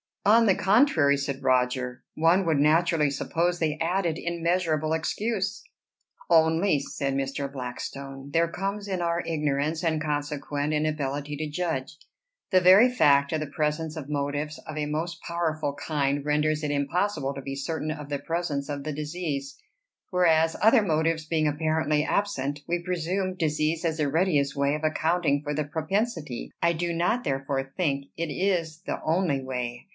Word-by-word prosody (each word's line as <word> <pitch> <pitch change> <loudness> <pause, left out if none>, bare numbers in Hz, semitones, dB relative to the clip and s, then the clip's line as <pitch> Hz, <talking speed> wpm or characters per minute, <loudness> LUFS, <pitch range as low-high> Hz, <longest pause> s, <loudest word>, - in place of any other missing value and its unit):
"On 230 +3 +6
the 195 -4 +4
contrary," 190 - +4
said 140 -1 -4
Roger, 125 -1 +1
"one 170 +4 +3
would 160 -3 +2
naturally 160 0 +3
suppose 170 +5 -1
they 155 -2 -1
added 170 -1 0
immeasurable 170 -2 0
excuse." 205 +6 -2 0.7
"Only," 160 0 +4
said 140 0 -3
Mr. 135 0 -2
Blackstone, 135 +1 -6
"there 165 +2 +3
comes 195 +4 -4
in 190 -3 -2
our 170 0 0
ignorance, 150 0 -1
and 160 -2 +1
consequent 145 0 -2
inability 150 -1 -2
to 155 0 -3
judge. 155 -3 -3 0.5
The 185 -1 +5
very 190 +7 +7
fact 140 - +4
of 160 - +1
the 155 - -3
presence 150 +2 -2
of 150 -3 -7
motives 145 +1 -2
of 155 - -6
a 150 - 0
most 165 +3 -3
powerful 155 -4 -2
kind 145 -1 -1
renders 150 +1 +1
it 150 - -1
impossible 145 0 0
to 135 - -5
be 135 +1 -5
certain 155 +2 -3
of 150 -2 -7
the 145 -1 -2
presence 160 -4 -2
of 140 -1 -4
the 155 0 -3
disease; 150 -2 -4 0.5
whereas 165 -3 +3
other 225 +2 +6
motives 160 -2 0
being 155 -1 +1
apparently 155 0 +1
absent, 145 -8 -1
we 175 0 -1
presume 185 +2 -1
disease 155 -1 0
as 160 -1 0
the 150 -2 +1
readiest 145 -3 +1
way 140 +1 +1
of 155 - -6
accounting 155 -1 +1
for 150 0 -2
the 155 +1 0
propensity; 160 - -2
I 170 0 +3
do 170 +1 -2
not 180 +9 +1
therefore 135 0 -2
think 140 -6 0
it 165 -2 -2
is 170 -2 -1
the - - -3
only 160 -5 +1
way. 125 -2 -4
155 Hz, 160 wpm, -26 LUFS, 145-170 Hz, 0.7 s, very